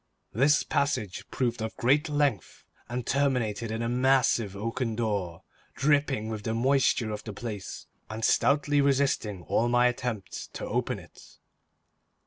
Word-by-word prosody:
This 140 +7 +4
passage 140 - -1
proved 120 -2 -1
of 110 0 -4
great 145 +6 +2
length, 145 - -1 0.3
and 120 0 -3
terminated 125 -6 0
in 110 +1 -2
a - - -1
massive 125 -4 +2
oaken 115 +2 -2
door, 100 -7 -2 0.3
dripping 140 -3 +1
with 110 -1 -4
the 110 +2 -2
moisture 130 -2 +2
of 105 - -5
the 110 - -7
place, 105 -2 -6 0.2
and 110 +1 -2
stoutly 145 0 +3
resisting 135 -9 +1
all 120 +7 +1
my 120 0 +4
attempts 120 -5 -2
to - - -5
open - - -1
it. - - -14
120 Hz, 140 wpm, -28 LUFS, 110-135 Hz, 0.3 s, This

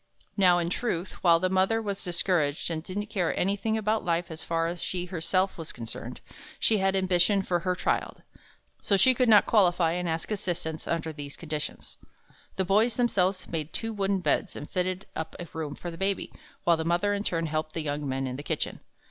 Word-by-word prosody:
Now 180 -3 +5
in 170 0 -1
truth, 185 -5 -3
while 170 -2 +6
the 185 - +1
mother 190 +4 +2
was 200 -3 -4
discouraged 170 -4 +1
and 160 -1 -2
didn't 190 +5 -4
care 200 -5 -1
anything 205 +4 +1
about 215 0 0
life 170 0 0
as 160 0 -7
far 165 0 0
as 170 +1 -3
she 180 -1 -2
herself 185 +2 0
was 160 - -5
concerned, 115 -2 -7 0.4
she 220 -2 +3
had 195 0 +2
ambition 190 +1 +3
for 175 -2 0
her 180 +1 0
child, - - -1 0.6
so 200 - +2
she 255 +7 +6
could 250 -1 +2
not 210 -2 +7
qualify 175 -6 +4
and 175 0 -1
ask 160 +5 -3
assistance 170 -5 -3
under 160 -1 -1
these 145 -1 -7
conditions. 155 -3 -5 0.6
The 190 - 0
boys 215 +5 +3
themselves 195 -6 +1
made 160 -2 -4
two 225 0 -2
wooden 195 -2 0
beds, 185 +2 0
and 150 - -6
fitted 185 +1 -2
up 160 0 -4
a 175 - -6
room 155 -3 -4
for 175 - -6
the 165 - -10
Baby, 195 0 -1 0.3
while 170 -1 +4
the 160 - -2
mother 175 +5 +1
in 200 0 -1
turn 165 -4 -1
helped 155 0 -2
the 165 - -2
young 145 -1 -2
men 135 0 -1
in 130 0 -4
the - - -5
kitchen. - - -3
180 Hz, 205 wpm, -28 LUFS, 165-195 Hz, 0.6 s, not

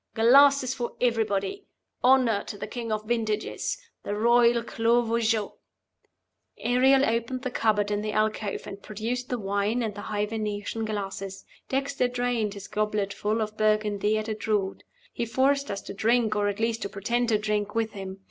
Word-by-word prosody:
Glasses 265 +3 +6
for 240 -3 -4
everybody! 225 - 0 0.4
Honor 250 -5 +4
to 205 - -7
the - - -5
King 235 -2 -5
of 215 0 -1
the 215 - -15
Vintages 220 - -1 0.2
the 205 - -3
Royal 235 +1 +4
Clos 235 +1 +1
Vougeot!" 225 -2 +1 1.0
Ariel 265 +3 +4
opened 235 +2 -1
the 255 - -2
cupboard 210 -3 +1
in 205 0 0
the 215 0 -2
alcove, 215 -1 -1
and 200 0 -8
produced 235 +4 -4
the 250 - -1
wine 205 +3 0
and 220 -2 -2
the 205 - -7
high 210 0 -1
Venetian 215 0 -3
glasses. 195 -2 -5 0.2
Dexter 275 -1 0
drained 245 -4 -1
his 200 -1 -8
gobletful 210 +1 -1
of 215 0 -6
Burgundy 215 -1 +1
at 215 0 -3
a 220 - -1
draught; 210 -2 -1 0.3
he - - -2
forced 275 +4 +1
us 200 -1 -3
to - - -7
drink 225 +1 +2
(or 205 -1 +1
at 205 0 -2
least 230 0 0
to 200 - -3
pretend 235 +5 -1
to 215 - +4
drink) 210 0 -2
with 225 -1 0
him. 190 -1 -7
220 Hz, 175 wpm, -27 LUFS, 210-240 Hz, 1.0 s, Glasses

